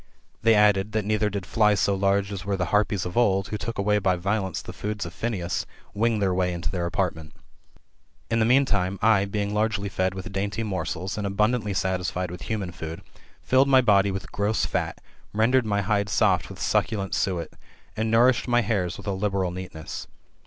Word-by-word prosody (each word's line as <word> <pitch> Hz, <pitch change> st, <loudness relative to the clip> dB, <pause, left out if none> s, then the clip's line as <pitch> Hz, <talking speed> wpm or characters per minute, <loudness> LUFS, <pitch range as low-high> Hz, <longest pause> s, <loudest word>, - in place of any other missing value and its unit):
They 115 Hz, +1 st, +5 dB
added, 105 Hz, 0 st, +3 dB
that 110 Hz, -2 st, 0 dB
neither 105 Hz, 0 st, +1 dB
did 100 Hz, -2 st, -4 dB
flies 105 Hz, -2 st, +3 dB
so 100 Hz, -, +2 dB
large 100 Hz, +1 st, +1 dB
as 95 Hz, -3 st, -5 dB
were 100 Hz, 0 st, -1 dB
the 90 Hz, -, 0 dB
Harpies 105 Hz, -2 st, +2 dB
of 90 Hz, -, -5 dB
old, 100 Hz, -5 st, +2 dB
who 105 Hz, -, -3 dB
took 115 Hz, -, -4 dB
away 105 Hz, +1 st, +2 dB
by 95 Hz, -2 st, +2 dB
violence 95 Hz, 0 st, -1 dB
the -, -, -8 dB
food 105 Hz, -1 st, -4 dB
of 85 Hz, -, -7 dB
Phineas, 95 Hz, -3 st, -3 dB, 0.3 s
wing 115 Hz, +2 st, +1 dB
their 95 Hz, -3 st, +1 dB
way 90 Hz, 0 st, +1 dB
mto 85 Hz, -, -3 dB
their 85 Hz, -2 st, -2 dB
apartment. 85 Hz, -3 st, -2 dB, 0.9 s
In 115 Hz, -, 0 dB
the 110 Hz, -, +3 dB
meantime, 105 Hz, -7 st, +2 dB
I, 110 Hz, -3 st, +4 dB
being 100 Hz, 0 st, -2 dB
largely 105 Hz, -1 st, 0 dB
fed 95 Hz, 0 st, -1 dB
with 95 Hz, +3 st, -6 dB
dainty 100 Hz, +3 st, -2 dB
morsels, 95 Hz, -1 st, -3 dB
and 100 Hz, -, -2 dB
abundantly 105 Hz, +1 st, 0 dB
satisfied 90 Hz, -1 st, -1 dB
with 90 Hz, -, -8 dB
human 100 Hz, -5 st, -2 dB
food, 80 Hz, 0 st, -7 dB, 0.4 s
filled 130 Hz, +2 st, +4 dB
my 130 Hz, -1 st, +6 dB
body 100 Hz, -4 st, +4 dB
with 95 Hz, 0 st, -5 dB
gross 105 Hz, +2 st, 0 dB
fat; -, -, -2 dB, 0.4 s
rendered 115 Hz, +3 st, +3 dB
my 100 Hz, -1 st, +1 dB
hide 100 Hz, +1 st, 0 dB
soft -, -, +2 dB
with -, -, -10 dB
succulent 100 Hz, -3 st, 0 dB
suet; 90 Hz, -5 st, -1 dB, 0.5 s
and 110 Hz, +1 st, -1 dB
nourished 120 Hz, +4 st, +4 dB
my 120 Hz, 0 st, +3 dB
hairs 100 Hz, -5 st, -1 dB
with -, -, -11 dB
a 100 Hz, -, -1 dB
liberal 95 Hz, -2 st, -1 dB
neatness. 90 Hz, -3 st, -7 dB
100 Hz, 195 wpm, -25 LUFS, 95-110 Hz, 0.9 s, my